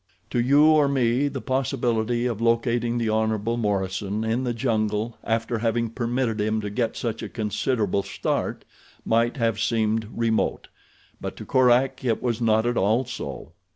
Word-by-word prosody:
To - - 0
you 140 +5 +5
or 155 -2 +5
me 130 0 +2
the - - -4
possibility 120 -3 0
of 115 -3 -2
locating 115 0 +1
the 115 -1 0
Hon. 110 0 +1 0.2
Morison 100 0 -1
in 115 +3 0
the 120 - 0
jungle 110 -2 -1
after 115 0 -1
having 115 0 0
permitted 120 -2 -1
him 110 +1 0
to 105 -1 -4
get 115 +1 -1
such 115 -2 -3
a - - -5
considerable 105 -2 -1
start 100 0 -3 0.4
might 115 +3 +2
have 115 -3 0
seemed 110 -1 0
remote; 115 -1 -1 0.5
but - - -5
to - - -9
Korak 130 +1 +3
it 115 -4 +1
was 120 -2 -2
not 110 -1 +3
at 120 0 0
all 110 +7 +2
so. 115 - -7
115 Hz, 160 wpm, -24 LUFS, 110-120 Hz, 0.5 s, you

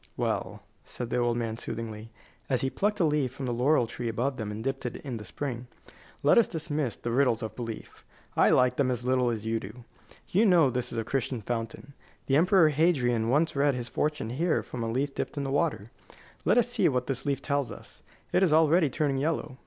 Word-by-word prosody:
"Well," - - -2 0.2
said 120 -1 -7
the - - +1
old 120 -1 +1
man, 115 -2 -2
soothingly, 110 -1 -6 0.4
as 130 -3 +1
he 135 - -1
plucked 210 +1 0
a 170 - +4
leaf 150 -5 +1
from 130 +1 -6
the 125 - -1
laurel 125 +2 +3
tree 115 +1 -4
above 125 +4 -1
them 110 -2 -4
and 105 +1 -5
dipped 135 +1 -2
it 125 - -4
in 130 -4 -6
the 105 - -8
spring, 125 0 -5 0.6
"let 145 +11 +6
us 230 - +4
dismiss 150 -6 -2
the 120 - -4
riddles 125 -2 +2
of 110 - -5
belief. 115 -3 -7 0.3
I - - +5
like 125 -1 +3
them 140 -2 +2
as 125 -1 -2
little 125 -1 +2
as 110 -2 -3
you 115 0 0
do. 115 +4 -10 0.4
You 215 +5 +3
know 165 -8 +5
this 125 0 -2
is - - -5
a 115 - 0
Castalian 125 -1 -2
fountain. 115 +5 -5 0.3
The 135 - +2
Emperor 175 +1 +5
Hadrian 130 -8 +2
once 150 +5 +2
read 140 -1 +2
his 120 -1 -5
fortune 150 -6 -1
here 160 +6 0
from 120 -2 -5
a 115 - -2
leaf 135 +4 -1
dipped - - -4
in 140 - -1
the 135 - -3
water. 140 - -1 0.5
Let - - +4
us - - +4
see - - +2
what 125 -1 -1
this 135 -1 -2
leaf 140 -2 +1
tells 140 -2 -1
us. - - -12 0.3
It - - +4
is 185 -5 +4
already 160 0 +4
turning 140 -1 0
yellow. 145 -3 -2
130 Hz, 225 wpm, -28 LUFS, 120-145 Hz, 0.6 s, let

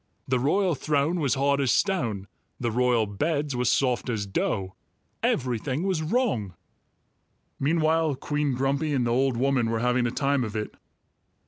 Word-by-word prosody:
The 130 -1 +1
royal 180 +8 +2
throne 150 +4 0
was 140 -5 +1
hard 140 +1 +2
as 135 - +1
stone; 120 - 0 0.3
the 120 -2 -1
royal 120 -1 +2
beds 145 +7 -1
were 125 0 -1
soft 125 0 +1
as 110 -4 -1
dough; 95 -1 -2 0.5
everything 130 +4 -1
was 190 -4 0
wrong." 155 - -1 1.0
Meanwhile 160 0 +2
Queen 145 0 -1
Grumpy 140 +4 0
and 125 -3 +1
the 120 - 0
old 130 0 +1
woman 130 -2 +1
were 115 - 0
having 125 +1 +1
a - - 0
time 140 0 +1
of 110 -2 -5
it. 105 -1 -3
135 Hz, 155 wpm, -26 LUFS, 120-150 Hz, 1.0 s, royal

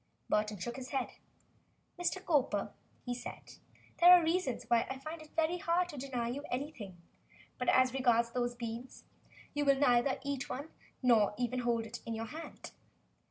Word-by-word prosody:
Burton 210 0 +1
shook 240 +7 -5
his 260 0 -7
head. 270 -3 -1 0.9
"Mr. 370 +2 -1
Cowper," 275 - +1 0.3
he 245 - -1
said, 245 - -8 0.4
"there 345 - +8
are 355 -1 +7
reasons 325 -6 0
why 235 -1 +4
I 265 - -4
find 310 +4 -7
it 310 - -15
very 330 +2 +1
hard 350 +1 +1
to 295 - -8
deny 250 -3 -2
you 265 +4 -3
anything, 245 - -5 0.6
but 250 - +1
as 255 -1 +4
regards 235 -3 +3
those 245 0 -1
three 230 -1 -4
beans, 255 +2 -14 0.5
you 290 - 0
will 275 -1 +4
neither 260 -1 +3
eat 280 -1 -3
one 285 +4 -5 0.3
nor 220 -5 +4
even 250 +1 -1
hold 235 -2 0
it 230 +2 -7
in 230 - -4
your 225 +1 -3
hand. 315 +8 -9
255 Hz, 175 wpm, -33 LUFS, 235-290 Hz, 0.9 s, there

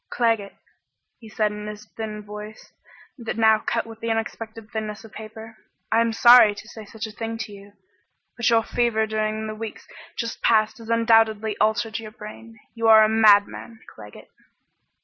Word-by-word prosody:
"Claggett," 225 -4 0 0.6
he 225 - -13
said 215 -1 0
in 210 0 -7
his 210 0 -8
thin 215 -1 -7
voice 210 +1 -10 0.5
that 230 - -4 0.3
cut 230 - 0
now - - -15
with 225 - -13
the 230 - -4
unexpected 225 0 -4
thinness 215 -1 -5
of 225 - -14
paper, 220 +1 -11 0.3
"I 225 - +4
am 230 0 +1
sorry 235 -2 +7
to 215 - -11
say 220 -2 -11
such 220 +2 -7
a 220 - -8
thing 225 +1 -5
to 225 -2 -6
you, 200 0 -13 0.6
but 235 - +1
your 230 -1 +3
fever 235 -2 0
during 215 0 -2
the 215 - -5
weeks 215 0 -8 0.3
just 230 -1 -4
past 215 0 +2
has 225 0 -11
undoubtedly 225 -2 +3
altered 220 +1 0
your 220 -1 -8
brain. 225 +1 -12
You 230 -1 -1
are 220 -1 +8
a 215 - +3
madman, 220 +1 +3
Claggett." 105 0 -14
220 Hz, 175 wpm, -23 LUFS, 215-225 Hz, 0.6 s, are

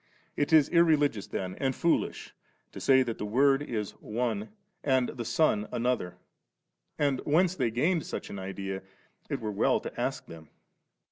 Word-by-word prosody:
It 145 - 0
is 155 -3 +6
irreligious 150 - +3
tiien 95 -1 -4
and 135 -2 0
foolish 170 - 0 0.4
to - - -8
say 130 -1 +5
that 115 -3 -5
the - - -3
Word 135 +6 +3
is 110 -8 -3
one 110 -2 -2 0.3
and 130 -3 +2
the 120 - -5
Son 110 -6 +1
another, 120 -7 -1 0.8
and 140 -3 +1
whence 170 +4 +2
they 130 -9 0
gained 155 +8 +1
such - - -5
an 100 - -6
idea 95 0 -5 0.5
it - - -2
were 110 -1 -3
well 100 - +2
to - - -6
ask - - -2
them. 80 -2 -12
125 Hz, 160 wpm, -29 LUFS, 105-145 Hz, 0.8 s, is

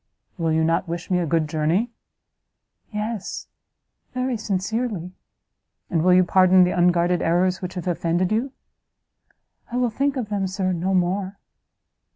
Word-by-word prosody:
"Will 165 -3 -1
you 160 0 +2
not 165 +3 +1
wish 170 +2 -5
me 180 - +3
a 170 - -1
good 160 0 +1
journey?" 160 +10 0 1.0
"Yes, 210 -1 -4 0.7
very 255 0 -1
sincerely." 210 -2 -2 0.8
"And 165 -3 +2
will 180 0 +5
you 185 - +6
pardon 185 0 +5
the 180 - +1
unguarded 175 0 +3
errors 180 +2 +1
which 185 0 -5
have 180 -1 -5
offended 175 +1 0
you?" 235 +5 0 1.2
"I 245 - -2
will 245 -2 +1
think 275 +4 0
of 235 -5 -3
them, 200 -2 -1
Sir, 185 -1 -1
no 185 +3 0
more." 185 +2 0
185 Hz, 150 wpm, -23 LUFS, 175-210 Hz, 1.2 s, you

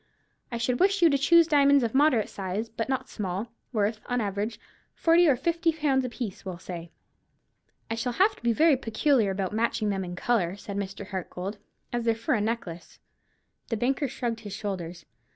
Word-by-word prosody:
I 235 - -2
should 245 +1 0
wish 390 0 +3
you 330 - +7
to 280 - +3
choose 335 +4 +6
diamonds 285 -3 +5
of 230 - -1
moderate 265 -5 +4
size, 195 +4 -4
but 225 +2 -4
not 265 -1 -1
small; 200 +2 -4 0.2
worth, 215 -1 0
on 245 0 0
an 220 - 0
average, 205 +3 -3 0.4
forty 335 +1 +4
or 285 - +5
fifty 335 +5 +1
pounds 295 -4 +1
apiece, 235 -5 -5
we'll 185 -3 -5
say." 170 -1 -7 1.0
"I - - -3
shall 240 +2 -2
have 395 - +3
to - - -19
be 235 - +2
very 305 +4 +4
particular 230 -1 +2
about 195 0 -2
matching 220 -1 0
them 195 -1 -1
in 175 -1 -6
colour," 190 -3 0
said 200 0 -8
Mr. 200 0 -4
Hartgold, 190 +1 -5 0.3
"as 240 -1 -1
they're 230 -1 +3
for 225 - -1
a 215 - +1
necklace." 205 -6 -4 0.7
The 230 - -2
banker 270 +5 0
shrugged 240 -3 -3
his 205 -3 -8
shoulders. 180 -5 -5
230 Hz, 190 wpm, -27 LUFS, 200-270 Hz, 1.0 s, you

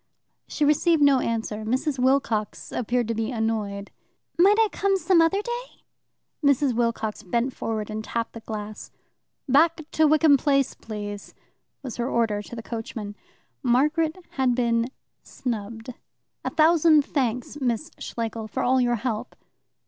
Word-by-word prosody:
She 300 - 0
received 300 +1 +3
no 280 -2 +5
answer. 225 -3 -2
Mrs. 260 +5 -1
Wilcox 250 -5 0
appeared 240 0 -1
to - - +1
be 225 0 -2
annoyed. 220 -4 -2 0.4
"Might 395 +5 +5
I 445 -1 +5
come 390 0 +1
some 370 -2 +4
other 390 +5 +2
day?" 480 +1 -6 0.6
Mrs. 280 -2 +3
Wilcox 230 -2 -1
bent 235 +7 -1
forward 215 -1 -3
and 215 0 -4
tapped 230 +1 -3
the 230 - -7
glass. 215 -1 -7 0.6
"Back 315 +5 +4
to 315 0 +4
Wickham 305 -1 +5
Place, 275 -1 +1
please!" 205 -2 -7 0.5
was 255 -4 -6
her 240 +1 -1
order 225 -4 +1
to 220 - -10
the 230 - -7
coachman. 220 -3 -6 0.5
Margaret 300 +7 +2 0.2
had 255 -2 +2
been 235 -1 +1 0.3
snubbed. 225 0 -5 0.5
"A - - -1
thousand 315 -2 +5
thanks, 255 0 -2
Miss 245 +4 -1
Schlegel, 225 -1 -4
for - - -3
all 255 +1 +3
your 240 -1 +2
help." 230 -2 -4
245 Hz, 145 wpm, -25 LUFS, 225-295 Hz, 0.6 s, no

